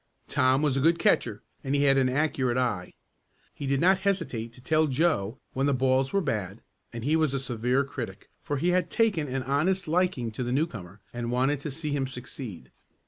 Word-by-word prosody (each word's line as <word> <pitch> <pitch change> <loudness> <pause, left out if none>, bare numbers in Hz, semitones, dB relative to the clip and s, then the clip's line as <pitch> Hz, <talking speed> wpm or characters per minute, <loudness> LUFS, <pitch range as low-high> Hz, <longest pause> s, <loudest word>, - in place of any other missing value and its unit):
Tom 130 +3 +2
was 145 -3 +2
a - - +1
good 165 +5 +4
catcher - - +1 0.2
and 135 +1 0
he 140 - +2
had 135 -1 +5
an 130 -1 +3
accurate 130 -3 0
eye. 115 -8 -1 0.6
He 140 - -6
did 135 0 +1
not 190 +4 +4
hesitate 165 - -1
to 125 - -16
tell 155 +5 +2
Joe 130 - +1 0.2
when 135 +2 +1
the 140 - +2
balls 130 +1 +2
were 200 - +2
bad 105 - -3 0.3
and 115 -1 -6
he 150 +5 +2
was 155 -4 +2
a - - 0
severe 125 +1 0
critic, 140 - -7
for 145 - -2
he 170 +6 +1
had 180 0 +1
taken 205 -10 +1
an 130 0 -2
honest 160 +8 +1
liking 165 -8 +1
to 120 +4 -4
the 120 - -2
newcomer, 105 - -3
and 120 -1 -3
wanted 130 +4 +1
to 145 - -5
see 150 +2 -4
him 140 -2 0
succeed. 125 - -8
135 Hz, 205 wpm, -27 LUFS, 125-155 Hz, 0.6 s, had